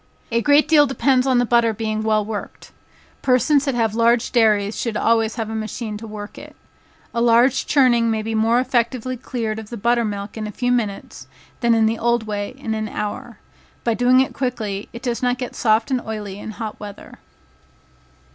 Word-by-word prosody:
A 230 0 +2
great 290 +4 +4
deal 295 -2 +5
depends 270 -1 +2
on 260 -2 +3
the 245 - +3
butter 235 -1 +3
being 215 0 -2
well 215 -1 +1
worked. 210 -1 -7 0.5
Persons 265 +3 +3
that 275 -3 -1
have 225 -3 +1
large 230 +1 +2
dairies 215 -3 +2
should 230 -3 -2
always 225 -1 +2
have 225 -2 -3
a 220 - -5
machine 220 0 -4
to 225 +1 -9
work 210 -1 -8
it. - - -12 0.6
A 235 - 0
large 240 +2 +3
churning 240 -5 +3
may 220 -1 -1
be 225 +1 -3
more 225 +2 +3
effectually 255 0 -1
cleared 225 -3 -4
of 215 -1 -10
the 235 - -6
butter 235 +2 +2
milk 205 0 -5
in 215 -1 -4
a - - -6
few 245 +4 -1
minutes, 220 -5 -3 0.3
than 235 -1 +3
in 225 -1 +3
the 225 +1 0
old 235 -1 +1
way 205 +2 -4
in 230 -5 -4
an 215 -1 -3
hour. 210 0 -5 0.5
By 235 - +1
doing 250 +2 +4
it 265 - -2
quickly, 220 -6 -3
it 235 +2 -10
does 240 -2 -2
not 250 0 +1
get 250 -1 -5
soft 220 +2 +1
and 255 -2 +1
oily 210 -3 -6
in 220 - -7
hot 215 0 -6
weather. 205 -1 -10
230 Hz, 200 wpm, -21 LUFS, 215-245 Hz, 0.6 s, deal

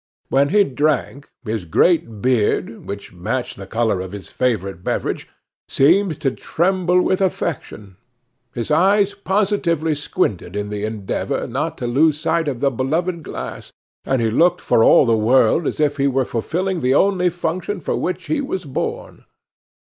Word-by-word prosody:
When 140 +1 +3
he 205 +4 +5
drank, 145 -2 -1 0.2
his 110 -3 -2
great 115 - +1
beard, 115 -2 0
which 100 -2 -7
matched 120 +8 -3
the 95 -1 -9
color 110 -3 0
of 95 +1 -7
his 100 -2 -8
favorite 100 -8 -1
beverage, - - -2 0.4
seemed 170 +3 +3
to 135 - +1
tremble 180 +5 +1
with 190 - +1
affection; 130 - -3 0.5
his 120 +2 -4
eyes 200 +5 +3
positively 190 -5 0
squinted 115 - -2
in 105 0 -3
the 105 0 -3
endeavor 110 -3 -3
not - - -3
to - - -4
lose 150 +5 +2
sight 165 +1 0
of 130 -4 -3
the 140 -1 +2
beloved 160 +8 -1
glass, - - -7 0.3
and 130 -3 0
he 110 - +1
looked 175 +8 +3
for 115 - +2
all - - +6
the 115 -2 +3
world 120 +7 +3
as - - -3
if 150 -1 +1
he 140 0 +2
were 135 -1 +1
fulfilling 175 +11 -2
the 130 +1 +2
only 185 0 +3
function 175 +3 -3
for 155 - -2
which 180 - -3
he 310 -2 -1
was 190 - -4
born. 135 - -5
140 Hz, 160 wpm, -20 LUFS, 115-175 Hz, 0.5 s, all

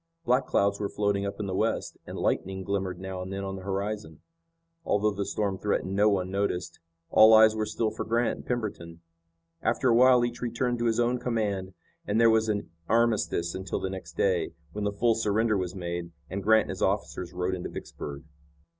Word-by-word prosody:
Black 125 +2 +2
clouds 100 0 +2
were 100 - -2
floating 100 -1 0
up 100 +1 -6
in 105 - -2
the 95 - -3
west, - - -1
and - - -6
lightning 95 0 -1
glimmered 95 -2 -2
now 95 -1 -5
and 95 +1 -6
then 100 0 -4
on 95 0 -4
the 95 - -7
horizon. 100 -4 -4 0.6
Although 105 -4 +2
the 100 -1 -3
storm 100 -3 -1
threatened 100 -2 -1
no 105 +2 +5
one 95 -2 0
noticed. 95 -2 -2 0.3
All 110 0 +8
eyes 110 0 +7
were 110 -1 -1
still 110 0 -1
for 110 - -4
Grant 115 +1 0
and - - -11
Pemberton. 90 -9 -4 0.6
After 130 - +1
a - - +5
while 125 0 +6
each 120 0 -5
returned 120 0 -1
to 120 - 0
his 115 0 +1
own 120 +1 +2
command, 100 -6 -2 0.3
and 105 +2 +1
there 115 -1 +6
was 110 0 +2
an 100 -5 -2 0.2
armistice 110 -7 +1
until 95 +1 -3
the 95 - -3
next 90 -4 -8
day, 90 -4 +1 0.2
when 105 +2 -3
the 100 - +1
full 115 +3 +2
surrender 110 0 +1
was 90 -2 -2
made, 85 -1 -4 0.2
and 100 +1 -3
Grant 110 +2 +5
and - - -6
his - - -7
officers 90 -2 -1
rode 90 +1 -2
into 90 -1 -4
Vicksburg. 70 +1 -7
100 Hz, 205 wpm, -28 LUFS, 95-110 Hz, 0.6 s, All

